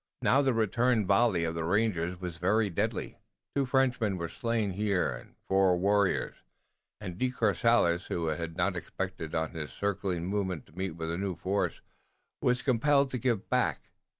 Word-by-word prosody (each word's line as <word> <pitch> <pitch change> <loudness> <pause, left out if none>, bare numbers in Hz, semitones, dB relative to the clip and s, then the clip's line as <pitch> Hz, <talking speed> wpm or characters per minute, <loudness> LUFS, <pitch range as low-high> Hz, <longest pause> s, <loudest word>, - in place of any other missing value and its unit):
Now 135 +3 +4
the 135 -2 +2
return 115 +1 +2
volley 100 -2 +3
of 80 0 -1
the 80 0 -3
rangers 90 -2 0
was 90 -3 -6
very 100 +4 +2
deadly. 85 - -2 0.4
Two 140 -2 +1
Frenchmen 125 -6 +1
were 85 -1 -4
slain 115 +1 -1
here 100 -5 0
and - - -10
four 95 -2 +4
warriors, 100 +1 +1 0.6
and 90 +1 -7
De 130 - +2
Courcelles, 110 -6 +2
who 85 - -2
had 80 +1 -4
not 100 - +1
expected 85 -1 -5
on 80 -1 -1
his 75 -5 -6
circling 95 -3 -2
movement 95 -5 -2
to - - -22
meet 95 -3 -3
with 80 -1 -4
a 85 - -3
new 95 -2 -2
force, 95 +4 -1 0.6
was 125 0 +1
compelled 140 +2 +3
to 125 - -2
give 115 -4 0
back. 110 - 0
95 Hz, 170 wpm, -30 LUFS, 85-115 Hz, 0.6 s, Now